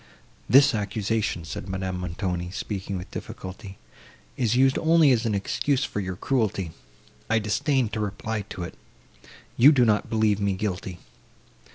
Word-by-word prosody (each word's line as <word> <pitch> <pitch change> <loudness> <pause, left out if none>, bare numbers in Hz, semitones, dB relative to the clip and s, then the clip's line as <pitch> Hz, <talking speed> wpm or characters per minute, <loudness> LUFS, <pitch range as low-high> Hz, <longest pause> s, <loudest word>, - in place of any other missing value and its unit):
"This 140 +2 +7
accusation," 105 -3 -1
said 95 - -6
Madame 95 -1 -3
Montoni, 90 0 -3
speaking 95 0 -4
with 90 - -8
difficulty, 95 +1 -8 0.6
"is 120 -2 +1
used 130 +1 +4
only 160 -3 +5
as 120 -2 +2
an 105 - 0
excuse 135 +7 0
for - - -3
your 95 -2 -3
cruelty; 100 - -1 0.6
I 115 - +3
disdain 115 +5 +1
to 110 - -4
reply 105 +1 -3
to 90 - -6
it. 85 - -6 0.8
You 135 +5 +8
do 130 -5 +4
not 105 -2 +1
believe 110 -2 +2
me 100 -1 +1
guilty." 95 -2 -4
105 Hz, 150 wpm, -25 LUFS, 95-120 Hz, 0.8 s, You